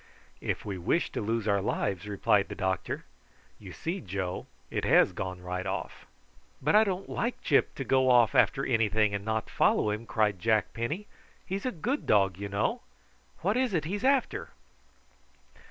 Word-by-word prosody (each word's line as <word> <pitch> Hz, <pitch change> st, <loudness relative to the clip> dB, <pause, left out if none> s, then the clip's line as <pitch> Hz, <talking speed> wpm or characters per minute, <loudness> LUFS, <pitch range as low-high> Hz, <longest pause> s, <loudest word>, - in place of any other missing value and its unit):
"If -, -, -3 dB
we 100 Hz, -3 st, -4 dB
wish 160 Hz, -, 0 dB
to -, -, -3 dB
lose 110 Hz, 0 st, -1 dB
our 100 Hz, -1 st, +2 dB
lives," 100 Hz, 0 st, -2 dB
replied 100 Hz, 0 st, +2 dB
the -, -, -5 dB
doctor. 95 Hz, -1 st, -2 dB, 0.5 s
"You 95 Hz, -3 st, -10 dB
see, 170 Hz, -, -4 dB
Joe, 95 Hz, -2 st, -4 dB, 0.2 s
it -, -, -2 dB
has -, -, +5 dB
gone 95 Hz, -1 st, -5 dB
right 90 Hz, +1 st, -3 dB
off." -, -, -5 dB, 0.5 s
"But 150 Hz, +7 st, +2 dB
I 215 Hz, -, +8 dB
don't 195 Hz, -2 st, -2 dB
like 240 Hz, +1 st, -3 dB
Gyp 145 Hz, -, +2 dB
to 135 Hz, -, -3 dB
go 130 Hz, 0 st, +3 dB
off 120 Hz, -4 st, +5 dB
after 135 Hz, -, +3 dB
anything 110 Hz, -3 st, +2 dB
and 100 Hz, 0 st, -2 dB
not 110 Hz, 0 st, -1 dB
follow 105 Hz, -, +2 dB
him," 110 Hz, +2 st, -5 dB
cried 105 Hz, -4 st, +1 dB
Jack 110 Hz, +1 st, +1 dB
Penny. 150 Hz, -, -3 dB, 0.4 s
"He's 195 Hz, +5 st, -3 dB
a -, -, 0 dB
good 245 Hz, -, -3 dB
dog, 95 Hz, -3 st, +3 dB
you 100 Hz, 0 st, -4 dB
know. 100 Hz, +2 st, -1 dB, 0.6 s
What 200 Hz, +6 st, +1 dB
is 255 Hz, -6 st, +1 dB
it 155 Hz, -3 st, 0 dB
he's 200 Hz, +5 st, -3 dB
after?" 270 Hz, -1 st, +1 dB
110 Hz, 175 wpm, -29 LUFS, 100-165 Hz, 0.6 s, I